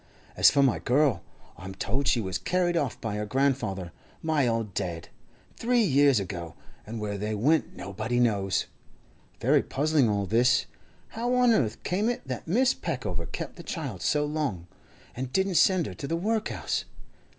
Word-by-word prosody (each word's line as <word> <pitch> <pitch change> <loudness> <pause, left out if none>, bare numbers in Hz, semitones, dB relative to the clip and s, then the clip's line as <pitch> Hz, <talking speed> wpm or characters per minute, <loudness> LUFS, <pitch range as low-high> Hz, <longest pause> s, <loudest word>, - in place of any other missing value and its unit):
As - - +7
for 140 -1 +3
my 130 -4 +2
girl, 140 0 +2 0.4
I'm 95 +1 -8
told 130 +8 -2
she 120 - +3
was 95 -3 -2
carried 175 - 0
off 145 -7 -1
by 105 -2 -3
her 105 - -2
grandfather, 110 -8 0 0.3
my 155 -5 +2
old 115 -4 -1
dad, 85 -3 -4 0.5
three 240 0 +2
years 140 - +4
ago, 85 -4 -6 0.3
and 115 +1 -5
where 105 -1 -3
they 105 +1 -2
went 145 +9 +1
nobody 110 +6 -3
knows. 100 -5 +1 0.7
Very - - +4
puzzling 145 -3 +1
all 100 -1 0
this. 120 +5 +3 0.4
How 240 +2 -1
on 250 -1 +5
earth 115 - +1
came 205 +6 0
it 240 - -4
that 130 +2 -5
Mrs. 250 +9 +2
Peckover 100 - -3
kept - - -6
the - - -8
child - - -5
so 150 0 +1
long, 145 - -2 0.5
and 130 0 -4
didn't 190 +3 +1
send 185 -1 +4
her 95 - -6
to 140 - -6
the 165 - -1
workhouse? 220 +4 -1
130 Hz, 170 wpm, -27 LUFS, 105-160 Hz, 0.7 s, As